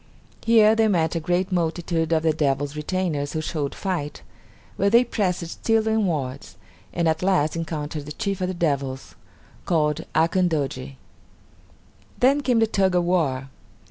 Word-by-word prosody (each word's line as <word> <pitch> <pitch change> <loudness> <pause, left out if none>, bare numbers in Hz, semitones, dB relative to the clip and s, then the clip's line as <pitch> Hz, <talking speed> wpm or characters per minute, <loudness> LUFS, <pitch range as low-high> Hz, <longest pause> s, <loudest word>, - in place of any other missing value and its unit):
Here 220 -2 +6
they 225 0 +3
met 165 -6 +1
a 165 - -1
great 180 +3 -1
multitude 165 -1 -1
of 160 -1 +2
the 160 -1 +3
devils' 145 -1 -1
retainers 150 -2 -2
who 155 - -1
showed 150 -3 -3
fight, 175 -7 -4 0.5
but 200 +2 +1
they 235 +1 +7
pressed 185 -7 -1
still 220 +6 0
inwards, 160 -12 -1 0.3
and 170 -1 0
at 160 0 +1
last 180 -5 +2
encountered 155 -3 -4
the - - -6
chief 200 -1 -3
of 180 - 0
the 185 - -3
devils, 140 -5 -2 0.5
called 155 -2 0
Akandoji. 160 -6 0 1.2
Then 275 +3 +4
came 250 -4 +1
the 225 - +4
tug 195 -4 +1
of 175 - +3
war. 145 -7 0
170 Hz, 150 wpm, -23 LUFS, 150-190 Hz, 1.2 s, they